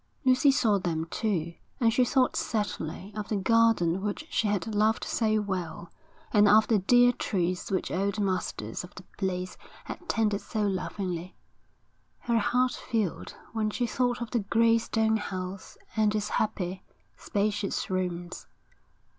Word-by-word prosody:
Lucy 255 +2 +5
saw 230 -7 +3
them, 165 -3 -2
too, 175 -7 -1 0.3
and 230 -2 +3
she 250 - +4
thought 255 +1 +2
sadly 205 -3 -3
of 210 -1 -4
the 215 - 0
garden 200 -4 +3
which 210 +9 -3
she 220 - +1
had 205 -4 0
loved 215 +1 +2
so 215 -2 +1
well, 180 -4 -4 0.4
and 210 -1 +6
of 215 +1 +6
the 220 -3 +3
dear 245 +5 +5
trees 185 -7 -2
which 190 - -1
old 200 +3 -1
masters 185 - -2
of 180 - -12
the 185 - -10 0.2
place 185 -2 -3 0.3
had - - -6
tended 210 -3 +1
so 215 -2 -2
lovingly. 185 -2 -3 0.9
Her 235 -1 +1
heart 250 +3 +2
filled 215 -7 -3 0.2
when 220 -1 0
she 240 +3 -1
thought 245 0 0
of 235 - -9
the 240 - +1
grey 230 +2 +3
stone 220 -1 +1
house 185 -2 -6 0.2
and 215 -1 +2
its 210 0 -1
happy, 190 -3 -1 0.3
spacious 205 -1 -1
rooms. 180 -1 -3
210 Hz, 150 wpm, -28 LUFS, 185-225 Hz, 0.9 s, and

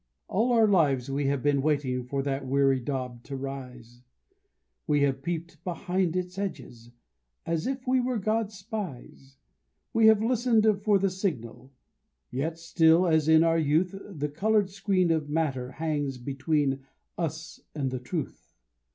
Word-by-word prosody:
All 230 +5 +1
our 225 -2 +5
lives 140 -10 +2
we 140 0 0
have 140 -2 0
been 145 -1 +2
waiting 135 -4 0
for 135 +2 -3
that 135 0 -2
weary 135 0 +3
daub 125 -2 -4
to 140 - -6
rise; 125 -3 -8 0.9
We 145 -1 +2
have 135 -1 0
peeped 170 +2 -5
behind 180 -1 -1
its 180 +1 -3
edges, 130 - -6 0.6
"as 165 +3 -1
if 265 -1 -3
we 255 0 +3
were 250 -1 0
God's 215 +1 -1
spies;" 175 - -7 0.6
We 225 -1 +5
have 220 -1 +5
listened 235 -2 +2 0.2
for 210 -2 +4
the 195 0 +1
signal; 135 - -4 0.6
yet 155 +6 -2
still, 165 +1 +4
as 160 -3 +2
in 160 0 +6
our 165 0 +3
youth, 160 +5 +1 0.2
The 150 -6 -3
colored 205 +5 +1
screen 190 -3 +1
of 155 -2 0
matter 135 -5 -1
hangs 145 -4 -2
between 140 +2 -1 0.4
us 160 -1 -4 0.2
and 135 -4 -1
the 130 - -3
truth. 145 +4 -6
155 Hz, 150 wpm, -27 LUFS, 135-190 Hz, 0.9 s, in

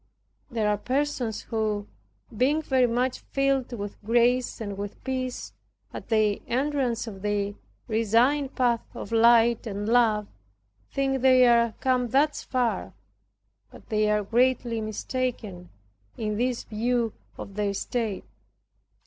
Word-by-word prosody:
There 225 -4 -1
are 210 -1 +1
persons 255 -4 -1
who, 215 -3 -2 0.5
being 285 +7 +2
very 260 -3 +3
much 245 +2 0
filled 275 -2 0
with 205 -3 -6
grace 240 +3 +2
and 205 -3 -4
with 200 +1 -7
peace, 255 -1 -4 0.4
at - - -8
their 215 -2 +2
entrance 260 -2 0
of 200 -4 -8
the 205 0 -1 0.3
resigned 240 +6 +2
path 240 -2 +2
of - - -7
light 230 0 +4
and 205 0 -4
love, 225 -3 +3 0.6
think 270 -1 -1
they 255 -1 +6
are 235 -2 +4
come 255 -2 +2
thus 285 +5 +2
far. 235 - -1 0.8
But - - -16
they 215 -1 +2
are 210 0 +2
greatly 235 +1 +1
mistaken, 215 -4 -4 0.5
in 210 -2 -2
this 245 +2 -1
view 230 +1 -1 0.2
of 200 - -8
their 205 -1 -1
state. 220 -2 -2
235 Hz, 130 wpm, -26 LUFS, 210-255 Hz, 0.8 s, they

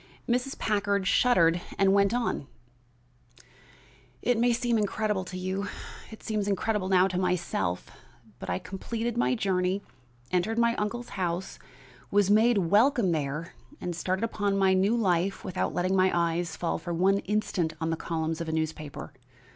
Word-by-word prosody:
Mrs. 250 +3 -1
Packard 200 -2 0
shuddered 175 -6 +4 0.2
and 195 0 +4
went 200 0 +4
on: 235 - -1 1.8
"It 245 - +3
may 240 +1 +4
seem 235 -1 +1
incredible 210 -1 0
to 185 - -7
you, 190 +2 -3 0.4
it 220 - -12
seems 210 -2 -1
incredible 200 0 0
now 185 0 +5
to 180 -1 -2
myself, 175 - -1 0.5
but - - -7
I - - 0
completed 225 +5 -4
my 245 +1 +2
journey, 190 -2 0 0.5
entered 185 +5 0
my 235 0 +3
uncle's 235 +3 -3
house, 180 -1 -3 0.5
was 205 -1 +3
made 225 +2 +5
welcome 205 - +3
there 150 +1 -3 0.3
and 175 -1 -4
started 185 +4 -1
upon 205 -3 0
my 190 -1 +4
new 195 +5 +3
life 190 -3 0
without 185 - -1
letting 185 +2 +1
my 185 0 +4
eyes 170 0 0
fall 170 - -1
for 170 0 -4
one 195 +3 +3
instant 195 -5 -1
on 160 0 -1
the - - +1
columns 160 0 -3
of 165 - -4
a - - -1
newspaper. 160 -2 -4
190 Hz, 155 wpm, -28 LUFS, 175-215 Hz, 1.8 s, now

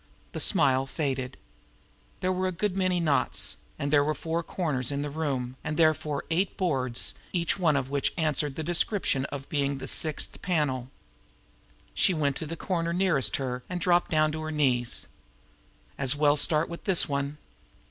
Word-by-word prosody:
The - - -5
smile 135 0 +3
faded. 135 -3 -3 0.8
There 185 - +1
were 185 0 0
a - - -1
good 185 +2 -2
many 185 -2 +1
knots; 155 -4 0 0.2
and 145 +1 -2
there 145 -1 +6
were 155 +1 0
four 165 +1 -2
corners 150 -8 -2
to 140 - -2
the 145 0 -3
room, 135 -5 -2
and 150 - -3
therefore 155 -3 +2
eight 180 +3 0
boards, 130 -10 +1 0.2
each 170 +1 0
one 160 -5 +3
of 135 -1 -1
which 140 -1 +1
would 165 - -1
answer 150 -1 +1
to 135 - -11
the 160 - -3
description 175 -4 +1
of 140 -1 -6
being 140 -2 0
the 135 - -7
"sixth 155 -2 0
panel." 140 -8 0 1.0
She 185 - +3
went 145 -3 0
to 160 - -4
the 165 +2 -5
corner 170 -2 -1
nearest 180 -7 +2
her, 125 -2 -3
and 180 -1 -3
dropped 175 0 +2
down 155 -1 +2
on 155 - -4
her 155 - -4
knees. 130 -6 +1 0.9
As 135 0 +2
well 145 0 +4
start 155 +1 +3
with 170 - -8
this 190 -4 +5
one! 140 0 -2
150 Hz, 180 wpm, -27 LUFS, 140-170 Hz, 1.0 s, there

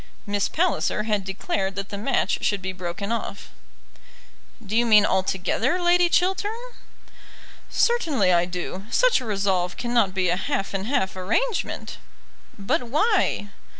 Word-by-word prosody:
Miss 205 -1 0
Palliser 330 -10 0
had 210 -2 0
declared 195 0 -3
that 195 0 -5
the - - -5
match 205 -2 0
should 205 - +1
be 190 0 -4
broken 185 +3 -5
off. 225 -3 -4 1.1
"Do 205 +2 -3
you 235 - +4
mean 215 -3 +6
altogether, 190 - 0
Lady 350 0 +4
Chiltern?" 380 +4 +1 1.2
"Certainly 295 - +2
I 175 0 +3
do. 180 +2 -6
Such - - +3
a - - -7
resolve 195 -4 0
cannot 235 -6 +1
be 185 -2 +1
a 175 - +2
half 260 -2 -2
and 195 +1 -3
half 190 -9 0
arrangement." 230 - -2 0.6
"But 200 +3 0
why?" 300 - +1
205 Hz, 140 wpm, -24 LUFS, 190-280 Hz, 1.2 s, mean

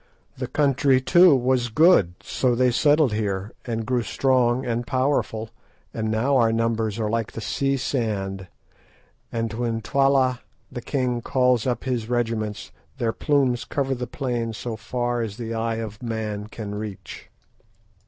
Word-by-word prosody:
"The - - -4
country, 140 -2 +3
too, 175 +4 +6
was 125 -1 +1
good, 115 - +4
so 125 -2 0
they 125 +1 +3
settled 145 -1 +3
here 100 -1 -2
and 115 -2 -3
grew 125 0 +1
strong 130 0 +1
and 120 0 -2
powerful, 130 -5 0 0.4
and 110 -1 -2
now 125 +6 +2
our 115 -2 +4
numbers 115 -1 0
are 110 - 0
like 115 0 -2
the - - -6
sea 135 +5 0
sand, 100 -8 -2 0.8
and 115 -1 -2
when 115 0 -1
Twala 135 0 +2 0.3
the 120 - -6
king 125 -2 -1
calls 125 -2 +2
up 120 -2 -1
his 120 -4 -2
regiments 115 -3 -2 0.3
their 115 -4 0
plumes 135 -5 +1
cover 135 -1 -1
the 125 -1 -4
plain 120 -3 -3
so 115 +2 -5
far 120 +2 -2
as 110 -2 -4
the 115 -2 -4
eye 115 0 -1
of 110 -2 -6
man 110 -3 -4
can 105 -2 -7
reach." 105 -2 -7
120 Hz, 155 wpm, -24 LUFS, 110-130 Hz, 0.8 s, too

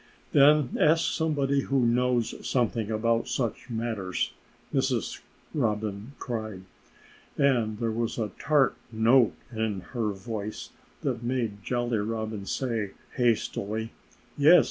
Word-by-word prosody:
"Then 145 -2 +5
ask 160 +2 +4
somebody 140 -4 +1
who 135 -2 +1
knows 120 -1 +2
something 115 -3 0
about 115 +1 +1
such 120 -2 -2
matters!" 110 -5 -2 0.4
Mrs. - - 0 0.3
Robin 110 -2 -1
cried. 110 -6 -4 0.7
And 120 -7 +2
there 115 0 -1
was 115 +1 -2
a 110 -3 -2
tart 140 -6 +3 0.2
note 115 +2 +4 0.2
in 110 -3 -1
her 115 -4 0
voice 105 +1 -5 0.3
that 125 -4 -1
made 120 -4 -2
Jolly 120 -2 0
Robin 110 -1 -3
say 115 -6 -2 0.2
hastily, 110 -2 0 0.5
"Yes! 155 +5 +8
115 Hz, 115 wpm, -28 LUFS, 110-130 Hz, 0.7 s, Yes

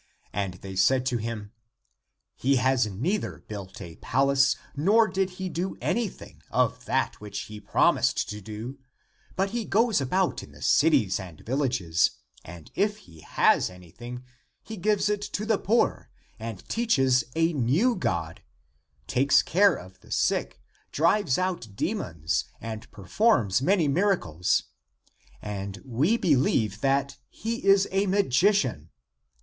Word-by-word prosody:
And 100 -2 -2
they 95 +1 -9
said 130 +8 +3
to 125 -2 0
him, 110 -2 -5 0.4
" - - -56 0.3
He 135 +2 +2
has 130 -2 +2
neither 140 - -3
built 100 -1 -8
a 85 -2 -9
palace 135 +1 +2 0.2
nor 210 +10 +4
did 190 -1 -1
he 190 - -3
do 180 +2 -3
anything 230 -4 -3
of - - 0
that - - -1
which 105 -1 -5
he 105 0 -9
promised 100 - +2
to 105 0 -6
do 110 +7 -7 0.6
but 195 +1 0
he 235 0 -2
goes 220 -4 +2
about 180 +8 0
in - - -13
the - - -15
cities 135 - +3
and 90 -5 -10
villages, 120 - 0 0.3
and 85 -2 -12
if 205 +1 0
he 80 -2 -17
has - - +2
anything, 95 +8 -10 0.4
he 220 - -7
gives 210 +2 +1
it 205 -1 0
to 205 0 -4
the 220 -2 +1
poor, 230 +3 +1 0.3
and 110 -4 -7
teaches 135 - +2
a 165 +1 +2
new 155 - +2
God, 85 - -2 0.6
takes 135 +3 +3
care 195 0 +4
of 95 -3 -12
the - - -20
sick, - - 0 0.3
drives 165 -2 +2
out 175 - -3
de - - -1
mons, 80 0 -2
and 110 -1 -7
performs 105 - +1
many 175 +1 +2
miracles. 140 - +1 0.8
And 100 -2 -5
we 140 - +1
be 160 -10 +3
lieve 110 -5 +1
that 140 0 +1
he 230 +1 -4
is 195 0 +5
a 195 +1 +1
magician. 175 - +2
135 Hz, 145 wpm, -26 LUFS, -, 0.8 s, is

